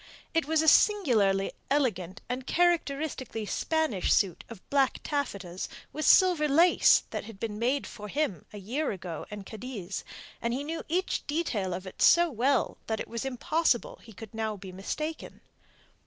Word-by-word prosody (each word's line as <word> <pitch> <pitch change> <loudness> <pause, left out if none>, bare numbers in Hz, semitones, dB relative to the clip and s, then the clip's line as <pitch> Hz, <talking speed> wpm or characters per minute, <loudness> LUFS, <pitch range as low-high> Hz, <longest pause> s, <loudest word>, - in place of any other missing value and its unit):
It 325 -3 +1
was 320 0 +2
a - - -1
singularly 225 - +4 0.2
elegant 210 - 0
and 250 +1 -4
characteristically 295 -9 0
Spanish 315 - 0
suit 190 -5 +2
of 225 -5 -12
black 275 -2 +3
taffetas 200 - -3 0.2
with 310 - -1
silver 355 -5 +6
lace 330 +5 +5
that - - -4
had 220 -3 -11
been 210 -2 -4
made 260 +4 +1
for 210 -1 -8
him 235 - -2
a 210 - -9
year 250 +10 -2
ago 175 -5 -6
in 210 -1 -7
Cadiz, 210 -3 -6 0.4
and 235 +1 -1
he 275 - -3
knew 325 +3 -4
each 365 +3 -1
detail 260 - -1
of 185 +2 -4
it 185 - -9
so 345 -1 +6
well 260 +2 +1
that 220 -1 -1
it - - -4
was 230 +2 -4
impossible 270 +1 0
he 230 - -14
could 220 +1 -11
now 220 -1 -2
be 190 -1 -9
mistaken. 305 - -5
245 Hz, 165 wpm, -29 LUFS, 205-305 Hz, 0.4 s, silver